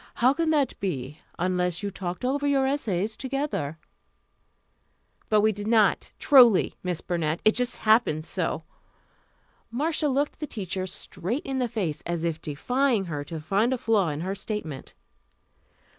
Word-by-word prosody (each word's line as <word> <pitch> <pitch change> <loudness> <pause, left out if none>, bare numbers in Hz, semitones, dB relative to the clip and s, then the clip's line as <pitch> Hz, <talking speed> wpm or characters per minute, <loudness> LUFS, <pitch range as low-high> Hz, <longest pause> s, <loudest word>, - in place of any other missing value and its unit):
How 255 +3 +4
could 320 +1 +1
that 290 -4 +2
be, 145 -7 -4 0.2
unless 180 +1 0
you 200 - -2
talked 180 +2 -5
over 285 +3 0
your 275 -2 +3
essays 220 -7 -1
together?" 265 - -3 1.5
"But 215 -1 +4
we 215 +1 +4
did 205 0 -6
not, 220 -3 +3
truly, 245 - +6
Miss 180 -2 -3
Burnett. 165 -2 -1
It 215 - +7
just 250 0 -1
happened 215 -9 +3
so." - - -2 1.1
Marcia 300 +6 0
looked 285 +1 0
the 300 - -4
teacher 190 -5 -4
straight 210 - -4
in 270 -1 -2
the 250 - +1
face, 180 -10 -2
as 170 -1 -2
if 165 -1 -2
defying 235 - 0
her 150 -4 -4
to 160 +2 -6
find 200 +10 +1
a - - 0
flaw 215 -7 +2
in 150 +1 -3
her 190 +3 -2
statement. 195 -8 -5
210 Hz, 155 wpm, -26 LUFS, 175-260 Hz, 1.5 s, It